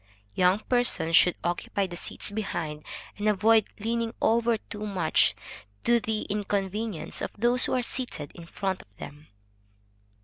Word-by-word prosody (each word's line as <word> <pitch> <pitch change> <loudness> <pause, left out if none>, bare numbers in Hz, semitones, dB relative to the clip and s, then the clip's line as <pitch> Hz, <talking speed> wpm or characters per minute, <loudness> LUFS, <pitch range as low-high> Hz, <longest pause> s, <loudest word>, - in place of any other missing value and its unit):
Young 180 +1 +4
persons 215 -11 +2
should 180 - +6
occupy 175 +3 -1
the 175 -2 -7
seats 175 - -2
behind, 170 -8 -4 0.4
and 210 +1 +2
avoid 215 +1 +4
leaning 230 +1 -1
over 230 0 +3
too 210 0 -7
much, 185 -6 +2 0.5
to 240 0 +4
the 220 -1 -2
incommoding 205 -1 -2
of - - -2
those 240 +3 +3
who - - -1
are 250 - +1
seated 245 - -4
in 170 -1 -11
front 190 +1 -3
of - - -21
them. 150 +2 -10
205 Hz, 145 wpm, -27 LUFS, 180-225 Hz, 0.5 s, should